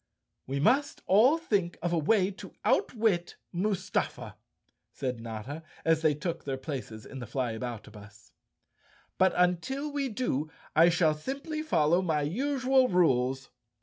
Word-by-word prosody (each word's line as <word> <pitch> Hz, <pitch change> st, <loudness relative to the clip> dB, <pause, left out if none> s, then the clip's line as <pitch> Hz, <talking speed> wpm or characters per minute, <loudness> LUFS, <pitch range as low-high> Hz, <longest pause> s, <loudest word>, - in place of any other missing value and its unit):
"We 135 Hz, +1 st, -2 dB
must 270 Hz, -, +2 dB
all 235 Hz, -, +5 dB
think 200 Hz, -, -1 dB
of 175 Hz, 0 st, 0 dB
a -, -, +2 dB
way 190 Hz, +4 st, +2 dB
to 195 Hz, -, -11 dB
outwit 215 Hz, -, +1 dB, 0.2 s
Mustafa," 190 Hz, +1 st, -2 dB, 0.6 s
said 125 Hz, -3 st, -4 dB
Notta, 115 Hz, +7 st, -6 dB, 0.2 s
as 165 Hz, -1 st, +3 dB
they 155 Hz, -2 st, +3 dB
took 165 Hz, +2 st, -4 dB
their 135 Hz, -1 st, -3 dB
places 130 Hz, -6 st, -6 dB
in 135 Hz, -, -8 dB
the 120 Hz, -, -7 dB
Flyabouta 120 Hz, -3 st, -4 dB
bus. 105 Hz, 0 st, -15 dB, 0.4 s
" -, -, -34 dB
But 190 Hz, 0 st, +4 dB
until 180 Hz, -, 0 dB
we 280 Hz, -2 st, -1 dB
do 180 Hz, -, -2 dB, 0.3 s
I 165 Hz, +2 st, +7 dB
shall 165 Hz, -2 st, +3 dB
simply 275 Hz, -, -4 dB
follow 170 Hz, -, +2 dB
my 160 Hz, -5 st, 0 dB
usual 260 Hz, -, +2 dB
rules." 135 Hz, -, +1 dB
170 Hz, 145 wpm, -29 LUFS, 135-220 Hz, 0.6 s, I